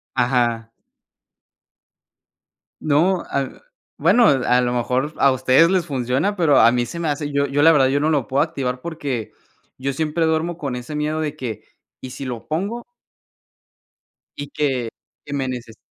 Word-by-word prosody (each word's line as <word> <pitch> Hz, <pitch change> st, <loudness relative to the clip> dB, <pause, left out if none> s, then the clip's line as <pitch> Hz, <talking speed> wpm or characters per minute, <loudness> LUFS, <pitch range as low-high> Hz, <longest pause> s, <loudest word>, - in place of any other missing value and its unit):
Ajá. 120 Hz, -3 st, +1 dB, 2.1 s
No, 170 Hz, +5 st, +2 dB
ah, 140 Hz, -1 st, -3 dB, 0.4 s
bueno, 240 Hz, -1 st, +4 dB
a 125 Hz, -4 st, +3 dB
lo 120 Hz, -, 0 dB
mejor 125 Hz, +5 st, -1 dB
a 140 Hz, -, +5 dB
ustedes 130 Hz, +5 st, +4 dB
les 185 Hz, -2 st, +1 dB
funciona, 135 Hz, +6 st, -1 dB
pero 160 Hz, -8 st, +3 dB
a 115 Hz, +1 st, +6 dB
mí 120 Hz, -1 st, 0 dB
se 170 Hz, -, -7 dB
me 165 Hz, -, -2 dB
hace, 145 Hz, 0 st, -2 dB
yo 140 Hz, 0 st, +1 dB
yo 140 Hz, +1 st, -1 dB
la 165 Hz, +2 st, +7 dB
verdad, 135 Hz, -4 st, +4 dB
yo 140 Hz, +2 st, +1 dB
no 150 Hz, -, +1 dB
lo 145 Hz, -7 st, +1 dB
puedo 135 Hz, +5 st, +1 dB
activar 135 Hz, -6 st, -3 dB
porque 140 Hz, -8 st, -4 dB, 0.4 s
yo 135 Hz, +1 st, -3 dB
siempre 160 Hz, +3 st, -1 dB
duermo 160 Hz, +2 st, 0 dB
con 140 Hz, -6 st, -4 dB
ese 125 Hz, +5 st, -7 dB
miedo 150 Hz, +1 st, -1 dB
de 150 Hz, -1 st, -3 dB
que, 120 Hz, -7 st, -5 dB, 0.4 s
¿y 130 Hz, -, -7 dB
si 135 Hz, -, -7 dB
lo 120 Hz, -3 st, -6 dB
pongo? 200 Hz, +10 st, -3 dB, 1.5 s
Y 145 Hz, 0 st, -6 dB
que 130 Hz, -6 st, -1 dB, 0.4 s
que 145 Hz, -, -6 dB
me 135 Hz, -2 st, -1 dB
neces 120 Hz, -3 st, -7 dB
140 Hz, 165 wpm, -21 LUFS, 125-155 Hz, 2.1 s, la